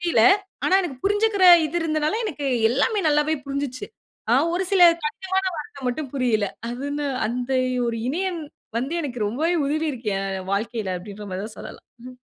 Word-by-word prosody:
புரியல்ல. 340 -11 +2 0.4
ஆனா, 375 - +3
எனக்கு 285 -8 -5
புரிஞ்சிக்கிற 410 -1 +2 0.2
இது 310 +3 -4
இருந்ததனால, 310 +1 0
எனக்கு 295 -8 -4 0.2
எல்லாமே 290 - +1
நல்லாவே 300 +1 +2
புரிஞ்சிச்சி. 275 -2 -4 0.5
ஆ, - - +6 0.2
ஒரு 375 - 0
சில 370 -2 +5 0.2
கடினமான 380 +5 -1
வார்த்த 280 -3 -7
மட்டும் 265 +2 -3
புரியல்ல. 225 -6 +1 0.2
அது 250 +3 -5
என்ன 295 0 -2 0.2
அந்த 245 +3 -3 0.4
ஒரு 230 -1 -2
இணையம் 355 +3 -2 0.4
வந்து, 270 +7 -3
எனக்கு 250 -6 -5
ரொம்பவே 310 +11 0
உதவி 310 +3 0
இருக்கு 230 -4 -4
என் 190 -1 -4
வாழ்க்கைல. 210 -2 -2
அப்டின்ற 205 +2 -9
மாரி 185 +2 -3
தான் 220 - -10
சொல்லலாம். - - -10 0.2
ம். 250 -1 -13
280 Hz, 165 wpm, -23 LUFS, 235-330 Hz, 0.5 s, ஆ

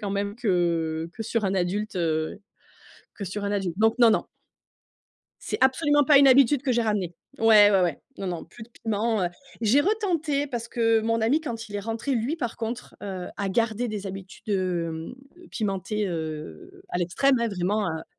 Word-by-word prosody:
quand 205 - -3
même, 200 +1 -2
que 170 -7 0
que 225 - -5
sur 225 0 -1
un 190 - 0
adulte, 190 +3 -1
heu, 160 0 -1 0.8
que 200 - -6
sur 200 +3 -5
un 200 - -1
adulte. 190 -4 -2
Donc 225 +2 +3
non, 235 -2 +7
non. 215 - +2 1.2
C'est - - -3
absolument 290 +2 +4
pas 285 -1 +7
une 275 - +7
habitude 270 +1 +5
que 265 - +1
j'ai 235 -1 +2
ramenée. 200 -6 -1 0.2
Ouais, 215 -3 +7
ouais, 195 - +4
ouais. 170 -5 -1 0.2
Non, 195 - -5
non, 175 -2 -4
plus 220 +7 -14
de 225 - -11
piment, 220 -2 -1
heu. 175 - +1 0.3
J'ai 230 +5 +4
retenté, 330 -7 0
parce 235 -3 -5
que 225 -1 +2
mon 230 +1 0
ami, 260 +8 +2
quand 230 -7 -6
il 205 - -10
est - - -2
rentré, 225 +6 -3
lui, 245 +7 -1
par 240 -8 -4
contre, 235 +2 -5
heu, 190 -3 -5
a 200 -1 -2
gardé 230 +3 0
des 205 -2 -4
habitudes, 195 +2 -9
hem, 175 -3 -2 0.4
pimentées, 205 -1 -2
heu, 155 - -6
à 175 - -2
l'extrême, 255 +10 +2
hein, 235 - +1
vraiment, 200 +2 -1
heu. 160 0 -5
215 Hz, 190 wpm, -25 LUFS, 185-235 Hz, 1.2 s, non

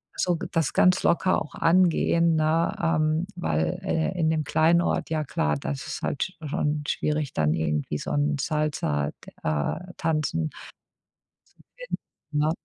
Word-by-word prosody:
so 175 -2 +1
g - - -5
das 165 -4 +1
ganz 180 0 +4
locker 185 +2 +3
auch 150 - -7
angehen, 170 -1 +3
ne, 160 +2 +2
ähm, 155 0 +1
weil, 80 - 0
äh, 165 +3 -1
in 160 -2 +2
dem 155 -1 0
kleinen 165 +3 +4
Ort, - - -1
ja 155 -1 -1
klar, 75 - 0
das 135 - -4
ist - - -4
es - - -11
halt 135 - 0
sch 190 - -6 0.2
schon 150 +1 -1
schwierig 150 -2 -1
dann 75 -1 +2
irgendwie 75 -2 -1
so - - -5
'n 145 0 +1
Salsa, 145 - 0 0.2
d - - -12
äh, 75 - 0 0.2
tanzen 160 0 0 1.1
zu - - -21
finden, - - -5 0.3
ne? 150 +1 +2
155 Hz, 165 wpm, -26 LUFS, 140-165 Hz, 1.1 s, ganz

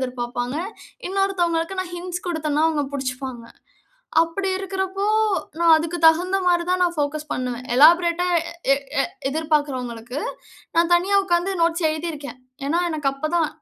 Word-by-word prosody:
எதிர்ப்பார்ப்பாங்க. 245 +1 -3 0.5
இன்னொருத்தவங்களுக்கு, 370 -3 0
நான் 360 -1 -5
ஹிண்ட்ஸ் 355 0 -5
குடுத்தனா, 310 -3 -1
அவங்க 305 -2 0
புடிச்சுப்பாங்க. 255 -3 -4 0.8
அப்படி 380 +4 -2
இருக்கிறப்போ, 385 0 -3 0.5
நான் 335 -1 +5
அதுக்கு 330 +2 -2
தகுந்த 355 +4 +4
மாரி 350 -1 +3
தான், 365 0 +1
நான் 350 -1 +1
ஃபோகஸ் 300 +1 -2
பண்ணுவேன். 250 -1 -3
எலாப்ரேட்டா 340 +4 +5 0.5
எ - - +7 0.3
எ - - 0 0.2
எதிர்பார்க்கிறவங்களுக்கு, 270 -5 -2 0.6
நான் 335 +1 +3
தனியா 380 +3 +2
உட்கார்ந்து 350 +1 +1
நோட்ஸ் 335 0 +1
எழுதியிருக்கேன். 310 -4 -5 0.3
ஏன்னா, 330 +4 +1
எனக்கு 305 -4 -1
அப்போ 275 +3 -4
தான் 320 -3 +2
330 Hz, 130 wpm, -22 LUFS, 285-355 Hz, 0.8 s, எ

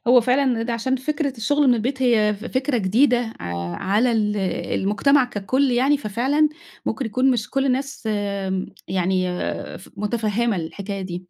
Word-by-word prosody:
هو 250 0 +7
فعلًا 250 +4 +2
إن 245 -4 +1
ده 240 - -1
عشان 245 +3 0
فكرة 285 0 -2
الشُغل 285 +5 +2
من 245 - +6
البيت 260 +4 -2
هي 215 -4 +3
ف 210 - -10
فكرة 260 0 0
جديدة 235 +3 +2
ع 85 0 -4 0.2
على 210 +6 +1
ال 210 -2 +1 0.4
المجتمع 255 +8 +3
كَكُلّ 255 +5 0
يعني، 265 +4 +3
ففعلًا 275 +6 +1 0.4
ممكن 225 +2 -1
يكون 255 +5 +2
مش 240 -4 -1
كُلّ 270 0 +1
الناس 270 -2 -2
م 200 -3 -2 0.2
يعني 185 0 +1 0.5
ف 190 - -15
مُتفهمة 215 +1 0
الحكاية 195 +4 -5
دي. 185 -2 -5
235 Hz, 165 wpm, -22 LUFS, 205-260 Hz, 0.5 s, هو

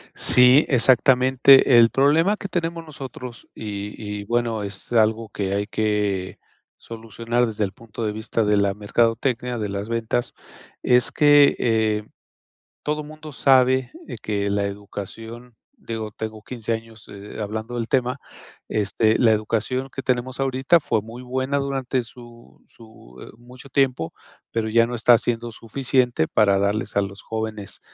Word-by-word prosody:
Sí, 125 +4 +6
exactamente. 130 +1 +5
El 115 0 +6
problema 160 - +3
que - - -6
tenemos 170 -2 -3
nosotros, 130 -5 -9
y 105 -1 -6 0.3
y - - -10
bueno, 115 -1 -1
es 100 +1 -6
algo 110 0 +2
que 100 -1 -3
hay 100 +1 -1
que 105 -3 -2 0.4
solucionar 115 +2 -3
desde 110 -1 -3
el 95 - -2
punto 115 +1 -9
de 105 - -1
vista 110 +1 -2
de 105 0 +2
la 100 -1 +1
mercadotecnia, 115 +3 0
de 105 -2 -3
las 100 +2 -5
ventas, 115 +1 -2 0.5
es 125 0 +3
que, 145 -1 +5
eh, 110 -2 +1 0.8
todo 150 0 -2
mundo 155 0 -11
sabe 130 -1 +3 0.3
que 100 -1 -2
la 100 0 0
educación 110 +4 -8 0.3
digo, 110 - -5
tengo 110 0 -7
15 115 -2 -4
años, 115 -1 -8
eh, 100 +1 -10
hablando 110 +3 -5
del 115 -1 -3
tema, 125 +1 0 0.5
este, 110 +1 +1
la 115 -3 +4
educación 115 +5 -1
que 135 - -7
tenemos 130 0 -2
ahorita 135 +5 +2
fue 110 -7 -1
muy 115 +3 -10
buena 130 +2 -2
durante 135 -2 -2
su 120 0 -16
su, 110 - -17
eh, - - -11
mucho 125 +3 -15
tiempo, 130 - 0 0.4
pero 115 -1 -2
ya 115 +1 +4
no 120 +1 -5
está 120 +1 +5
siendo 120 0 -3
suficiente 125 -5 0
para 100 -2 +3
darles 100 +1 -1
a - - +4
los 100 0 -6
jóvenes, 110 -3 -5
115 Hz, 150 wpm, -22 LUFS, 105-130 Hz, 0.8 s, Sí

